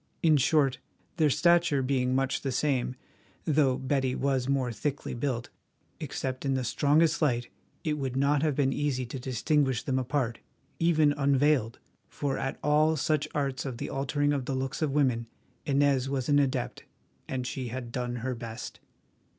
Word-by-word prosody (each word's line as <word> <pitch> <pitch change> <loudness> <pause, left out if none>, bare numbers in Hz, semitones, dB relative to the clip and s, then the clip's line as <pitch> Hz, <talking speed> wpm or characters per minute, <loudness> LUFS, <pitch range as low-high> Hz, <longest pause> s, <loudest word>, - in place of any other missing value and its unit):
In 160 -2 +5
short, 135 -2 +3 0.4
their 155 -2 +4
stature 170 -2 +3
being 130 -1 +1
much 135 0 0
the 135 - -2
same, 130 -1 0 0.5
though 140 -4 +3
Betty 130 -1 0
was 135 -2 0
more 135 -3 +1
thickly 140 +5 -3
built, 120 -1 -3 0.5
except 130 -1 -4
in 135 -1 +1
the 130 - -1
strongest 150 +7 +2
light 120 -5 +1 0.3
it 150 -1 -1
would 130 -2 -3
not 140 +1 +2
have 150 -3 +1
been 135 -1 +2
easy 135 -3 -1
to 125 +3 -6
distinguish 130 +1 0
them 130 -1 0
apart, 130 -2 -1 0.4
even 160 -3 +4
unveiled, 140 -4 +2 0.3
for 140 -2 -2
at 135 - -3
all 155 +2 +3
such 155 0 +1
arts 135 -3 -1
of 130 -4 -5
the - - -5
altering 145 +1 0
of 135 -3 -2
the 135 - -2
looks 135 +3 -3
of 155 - +2
women, 130 -5 +1 0.4
Inez 140 -2 +2
was 135 -2 -2
an 145 -1 +4
adept, 135 -3 -1 0.4
and 130 -1 -3
she 125 0 -4
had 120 0 -6
done 125 0 -3
her 130 - -1
best. 115 0 -7
135 Hz, 165 wpm, -28 LUFS, 130-145 Hz, 0.5 s, In